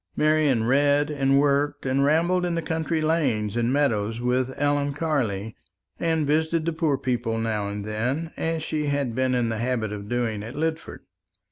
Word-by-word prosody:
Marian 150 -6 +2
read 145 +4 +3
and 135 -2 +2
worked 145 0 +1
and 135 +1 +2
rambled 170 +5 +2
in 175 -1 -1
the 165 - -1
country 160 0 -1
lanes 130 -10 0
and 120 +1 +1
meadows 115 -6 +1
with 125 +1 0
Ellen 145 0 +1
Carley, 115 -10 -1 0.4
and 160 -2 +1
visited 160 +2 +1
the 165 - 0
poor 155 -3 +1
people 120 -3 -1
now 110 -3 -1
and 100 0 -5
then, 125 +10 -2
as 160 -1 -2
she 150 -2 -2
had 140 -4 -1
been 130 +1 +1
in 120 -2 +1
the 110 -1 -3
habit 115 -3 -1
of 100 0 -7
doing 115 -4 -1
at 110 +4 -8
Lidford. 160 +2 -3
140 Hz, 175 wpm, -25 LUFS, 115-155 Hz, 0.4 s, read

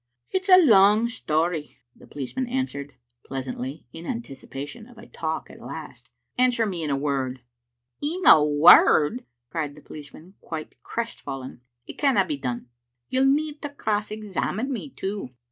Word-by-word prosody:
"It's 375 +1 -1
a 370 - +10
long 210 0 +6
story," 160 -7 -1 0.2
the - - -17
policeman 145 - -4
answered, 235 - -3 0.3
pleas 135 -1 -5
antly, 130 +3 -5
in 165 +1 -9
anticipation 145 - -7
of 245 -2 -17
a 230 - -12
talk 160 -1 -4
at - - -14
last. - - -9 0.2
" - - -49
Answer 250 -2 +3
me 185 -5 -3
in 155 - -2
a 140 - +1
Word. 135 -3 -2 0.2
" 120 0 -57
" 125 0 -52
In 335 +5 -2
a 155 - +9
word 150 +7 +6
!" 120 0 -57
cried 150 -4 -3
the 150 - -14
policeman, 155 +5 -12
quite 160 -2 -7
crestfallen. 135 - -6
" 120 0 -50
It - - -10
canna 265 -10 +3
be 150 -5 -3
done. 125 -2 -4 0.4
You'll 260 +1 +2
need 295 +2 +1
to 290 - -4
cross 215 -6 -2
examine 215 +4 -3
me, 260 +4 -5
too. 195 - -5
170 Hz, 175 wpm, -25 LUFS, 140-235 Hz, 0.4 s, a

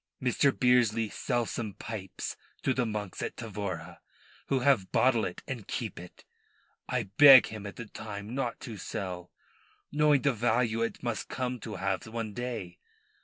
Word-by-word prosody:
Mr. 130 +2 +3
Bearsley 120 -4 +3
sell 120 0 -1
some 110 -3 -4
pipes 95 -5 -6 0.3
to 130 - +2
the 125 -2 0
monks 105 -3 -4
at - - -3
Tavora, 95 -7 -5 0.5
who 135 -2 +1
have 125 -8 +3
bottle 120 -3 +3
it 90 - -6
and 120 -6 -5
keep - - -4
it. 90 +1 -13 0.6
I - - 0 0.2
beg 140 -3 +10
him 105 -2 -7
at 100 - -8
the 120 - -7
time 105 0 -7
not 130 -3 -2
to 115 -4 -7
sell, 90 -2 -5 0.6
knowing 150 -2 +4
the 140 -2 +3
value 115 0 +1
it 115 - -2
must 120 -3 -3
come 125 -1 -2
to 105 0 -6
have 95 +1 -2
one 110 -1 -4
day. 115 -7 -5
115 Hz, 165 wpm, -30 LUFS, 100-125 Hz, 0.6 s, beg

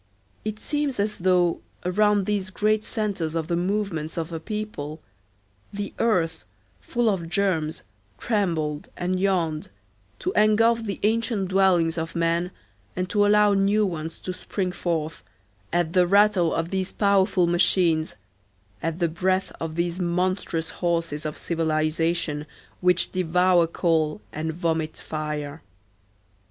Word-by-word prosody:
It 215 0 -4
seems 290 -4 -1
as 210 +1 -1
though, 180 -1 +3 0.3
around 205 +2 +3
these 200 -2 -1
great 215 +3 +1
centres 200 -9 -2
of 165 -1 0
the 170 - 0
movements 175 -4 -2
of 165 0 -3
a 165 - -3
people, 190 -6 -5 0.7
the 200 0 -5
earth, 165 -8 +1 0.4
full 240 -2 -1
of 180 -6 0
germs, 175 -5 0 0.3
trembled 165 -9 -1
and 180 +1 -1
yawned, 170 -5 0 0.5
to - - -2
engulf 225 +2 +4
the 200 -3 -4
ancient 220 -3 +1
dwellings 180 -4 +3
of 165 0 -5
men 170 +1 +1 0.5
and 185 0 -2
to 205 -1 +4
allow 210 0 +5
new 200 +2 +3
ones 165 -3 -4
to 185 - -5
spring 185 0 -3
forth, 165 -3 -2 0.5
at 175 -1 0
the 180 -2 +4
rattle 200 -3 +4
of 165 0 -1
these 190 0 -2
powerful 195 -3 +3
machines, 170 -2 +2 0.7
at 165 0 -2
the 175 -1 +2
breath 185 +3 0
of 160 -1 -4
these 170 +1 -1
monstrous 180 -2 -1
horses 165 -4 -1
of 150 - -6
civilization 160 -1 0 0.3
which 180 -1 +2
devour 180 -1 +3
coal 160 -1 +1
and 160 +1 -2
vomit 160 -2 -1
fire. 150 -1 -4
180 Hz, 135 wpm, -25 LUFS, 165-200 Hz, 0.7 s, allow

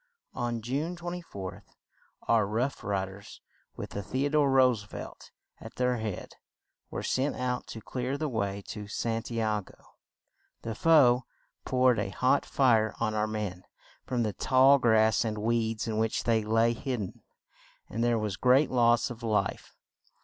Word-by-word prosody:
On 120 -2 -3
June 145 +9 -2
24th 170 - -7 0.5
our 110 -3 +3
"Rough 120 +7 -2
Ri 100 -2 -1
ders," 100 +1 -12 0.4
with - - -7
The 105 +8 -2
o - - +1
dore 150 -1 +3
Roose 130 -5 +4
velt 105 - -9 0.3
at - - -11
their 125 -1 +1
head, 110 -4 -5 0.5
were - - -5
sent 135 +3 0
out 125 -1 -2
to 110 - -8
clear 125 +4 -3
the 155 +1 -2
way 100 -5 -2
to 105 -1 -6
San 115 +2 -2
ti 115 +1 -4
a 110 -1 0
go. - - -17 0.9
The 115 - -3
foe 125 -3 +5 0.4
poured 125 -3 +3
a 100 - -2
hot 130 +8 +1
fire 115 -5 +3
on 110 - 0
our 105 0 0
men 105 -4 -4 0.4
from 125 -2 -1
the 105 -2 -1
tall 130 +7 +5
grass 110 -3 +4
and 110 -2 -2
weeds 115 0 -1
in 110 -1 -1
which 110 0 0
they 115 -2 +2
lay 115 +2 +2
hid 130 +2 -3
den; 95 - -7 0.7
and 115 +2 -3
there 120 -1 +2
was 105 -2 -2
great 130 +3 +4
loss 120 -1 +3
of 120 0 -9
life. 110 -2 -2
115 Hz, 165 wpm, -29 LUFS, 110-130 Hz, 0.9 s, foe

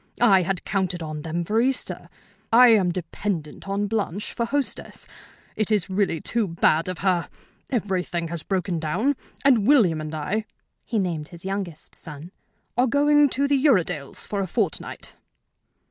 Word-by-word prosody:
I 200 -5 +6
had 180 +1 -2
counted 185 -3 -1
on 155 -1 -5
them 165 +2 -3
for 220 +5 +2
Easter. 260 +1 -1 0.4
I 245 +2 +8
am 200 -6 +4
dependent 170 -1 -4
on 200 +1 0
Blanche 205 -2 -2
for 235 - -1
hostess. 285 +2 -3 0.5
It 215 - 0
is 205 -4 +1
really 190 -4 +1
too 225 +6 -1
bad 165 -1 +2
of 185 -1 -3
her. 180 -3 +1 0.4
Everything 185 -7 -1
has 170 -1 -5
broken 185 -1 -1
down, 190 - 0 0.3
and 235 -7 +5
William 200 - +4
and 155 0 -5
I 200 +8 -2 0.4
(he 230 - -2
named 170 -6 -1
his 170 0 -12
youngest 190 -5 -5
son) 155 +3 -10 0.4
are 250 +2 +3
going 290 +2 +4
to 280 +2 +1
the 280 -1 +2
Uredales' 180 - +1
for 205 - -3
a 190 - -2
fortnight." - - -3
190 Hz, 160 wpm, -24 LUFS, 170-225 Hz, 0.5 s, I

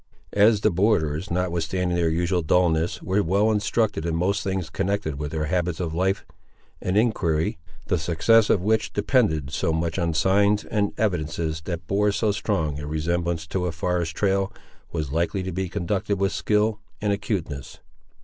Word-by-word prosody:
As 105 +1 +5
the 110 - +3
borderers, 90 -3 +1
notwithstanding 90 0 -1
their 85 -1 +2
usual 85 +2 +1
dulness, 85 0 +1
were 95 +3 +1
well 100 +4 +2
instructed 105 -3 0
in 85 -1 -1
most 95 +5 0
things 95 -4 -2
connected 95 -7 -2
with 75 -1 -3
their 75 0 -2
habits 90 0 -1
of 85 -3 -2
life, 95 +3 0 0.6
an 90 +2 0
enquiry, 85 -9 +1 0.3
the 90 - 0
success 90 +7 +3
of 90 - +3
which 110 +2 +1
depended 80 - +1
so 80 +3 0
much 80 +2 -1
on 85 -2 0
signs 100 +4 +3
and 100 -2 0
evidences 80 -5 -1
that 85 -2 -4
bore 105 +3 +2
so 105 +1 +1
strong 80 -8 -1
a 75 - -6
resemblance 85 +2 -1
to 90 +2 -2
a - - -1
forest 85 0 -2
trail, 95 -1 +1 0.4
was 75 -5 -3
likely 85 +5 0
to 95 - -4
be 95 +1 -3
conducted 100 +2 -1
with 100 0 +1
skill 105 0 +1 0.2
and 105 -1 +1
acuteness. 90 - -4
90 Hz, 170 wpm, -24 LUFS, 80-100 Hz, 0.6 s, As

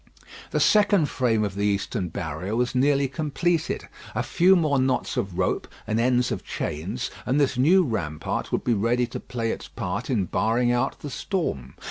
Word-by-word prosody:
The - - 0
second 205 -7 +4
frame 115 -4 +1
of 100 -2 -2
the 100 +1 -3
eastern 100 -1 -1
barrier 90 +3 -4
was 125 +1 0
nearly 140 +2 +3
completed. 160 +4 -1 0.3
A - - 0
few 185 +3 +4
more 155 -6 +2
knots 130 0 0
of 95 -3 -2
rope - - 0 0.2
and 110 +1 0
ends 125 +1 +2
of - - -3
chains 95 +12 -4
and 130 +4 +1
this 140 -2 +2
new 170 +10 +5
rampart 90 - -3
would - - 0
be 120 - +2
ready 115 +4 +2
to 120 - -6
play 115 -2 -3
its - - -6
part 100 +3 -4
in 110 -8 +1
barring 120 +6 +1
out 120 +2 0
the 145 - -6
storm. 75 - -3
125 Hz, 180 wpm, -25 LUFS, 100-140 Hz, 0.3 s, new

